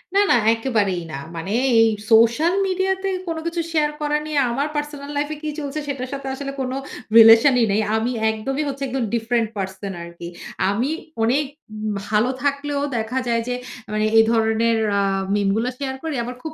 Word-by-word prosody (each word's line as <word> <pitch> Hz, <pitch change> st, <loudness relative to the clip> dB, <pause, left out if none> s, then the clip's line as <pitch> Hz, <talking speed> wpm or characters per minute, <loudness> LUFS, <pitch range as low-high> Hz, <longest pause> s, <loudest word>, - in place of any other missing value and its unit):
না, 400 Hz, -, +6 dB
না -, -, +6 dB, 0.2 s
একেবারেই 215 Hz, -7 st, 0 dB
না। 135 Hz, -, -4 dB, 0.2 s
মানে 165 Hz, +4 st, -5 dB, 0.3 s
এই 225 Hz, -, +6 dB, 0.2 s
সোশ্যাল 230 Hz, +10 st, +5 dB
মিডিয়াতে 380 Hz, +1 st, 0 dB, 0.2 s
কোনো 330 Hz, -1 st, -2 dB
কিছু 335 Hz, 0 st, -1 dB
শেয়ার 300 Hz, -2 st, +2 dB
করা 295 Hz, 0 st, +1 dB
নিয়ে 305 Hz, -2 st, 0 dB
আমার 275 Hz, +5 st, 0 dB
পার্সোনাল 295 Hz, -1 st, -4 dB
লাইফ 290 Hz, 0 st, 0 dB
এ -, -, -5 dB
কি 310 Hz, -, -2 dB
চলছে 290 Hz, 0 st, -4 dB
সেটার 265 Hz, -2 st, -4 dB
সাথে 275 Hz, -1 st, -5 dB
আসলে 275 Hz, 0 st, -5 dB
কোনো 255 Hz, 0 st, -2 dB, 0.4 s
রিলেশনই 230 Hz, +3 st, +8 dB
নেই। 210 Hz, +2 st, +2 dB
আমি 225 Hz, +3 st, 0 dB, 0.2 s
একদমই 270 Hz, +7 st, -2 dB
হচ্ছে 275 Hz, 0 st, -5 dB
একদম 260 Hz, -1 st, -2 dB
ডিফারেন্ট 230 Hz, 0 st, +1 dB
পারসন 190 Hz, 0 st, -4 dB
আরকি। 170 Hz, 0 st, -9 dB, 0.4 s
আমি 235 Hz, +7 st, 0 dB, 0.3 s
অনেক 265 Hz, +6 st, +2 dB, 0.6 s
ভালো 215 Hz, +4 st, +2 dB
থাকলেও 285 Hz, 0 st, -1 dB, 0.2 s
দেখা 225 Hz, +3 st, -2 dB
যায় 230 Hz, -1 st, +1 dB
যে 250 Hz, -, -1 dB, 0.4 s
মানে, 215 Hz, 0 st, +1 dB
এ -, -, +9 dB
ধরনের 225 Hz, 0 st, +2 dB, 0.2 s
আ -, -, +3 dB, 0.3 s
মিম 205 Hz, -1 st, +1 dB
গুলো 230 Hz, +3 st, 0 dB
শেয়ার 265 Hz, -2 st, -3 dB
করি। 320 Hz, -3 st, -3 dB
আমার 250 Hz, +2 st, -6 dB
খুব 315 Hz, -, -5 dB
250 Hz, 180 wpm, -21 LUFS, 225-290 Hz, 0.6 s, এ